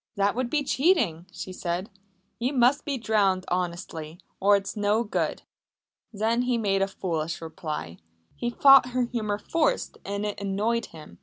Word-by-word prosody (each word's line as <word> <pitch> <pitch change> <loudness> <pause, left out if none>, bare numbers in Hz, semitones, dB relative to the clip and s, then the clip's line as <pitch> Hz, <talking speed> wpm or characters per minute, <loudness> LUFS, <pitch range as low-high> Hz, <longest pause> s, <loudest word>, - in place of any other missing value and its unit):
"That 200 0 +2
would 250 0 -2
be 295 +1 +1
cheating," 250 - +2
she 185 - -7
said. 180 +4 -3 0.5
"You 250 +4 0
must 260 +3 +3
be 280 -2 -1
drowned 200 -5 +1
honestly, 170 -2 -3 0.2
or 200 +1 +5
it's 195 +2 -2
no 210 +2 +2
good." 210 - -2 0.7
Then 225 +3 +1
he 250 -1 +1
made 195 -3 +1
a 195 - +2
foolish 165 -4 -3
reply. 155 - -6 0.4
He 240 - -2
thought 270 +1 +7
her 255 0 +2
humour 220 -4 -2
forced 330 - -1
and 200 +1 -3
it 205 -1 -4
annoyed 210 +4 0
him. 150 - -13
205 Hz, 160 wpm, -26 LUFS, 185-240 Hz, 0.7 s, thought